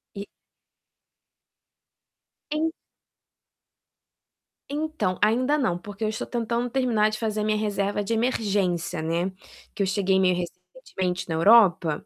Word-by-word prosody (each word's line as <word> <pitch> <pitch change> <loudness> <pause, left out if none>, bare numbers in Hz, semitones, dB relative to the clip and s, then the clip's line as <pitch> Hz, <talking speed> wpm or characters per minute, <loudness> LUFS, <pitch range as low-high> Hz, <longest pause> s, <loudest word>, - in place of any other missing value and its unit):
E 200 0 -6 2.3
En 315 +2 0 2.0
Então, 295 - -2
ainda 250 +7 +3
não, 185 -12 0
porque 205 +4 -8
eu 215 - +1
estou 220 - -4
tentando 235 +1 -2
terminar 235 -5 +2
de 215 0 -5
fazer 215 -2 -1
minha 215 0 +1
reserva 205 -1 -1
de 230 - -2
emergência, 200 -8 0
né. 170 +4 -1 0.4
Que 200 - 0
eu - - 0
cheguei 190 0 +1
meio 185 -1 +3
recentemente 180 +1 -5
na 165 - -2
Europa, 175 -4 +4
205 Hz, 120 wpm, -25 LUFS, 185-230 Hz, 2.3 s, Europa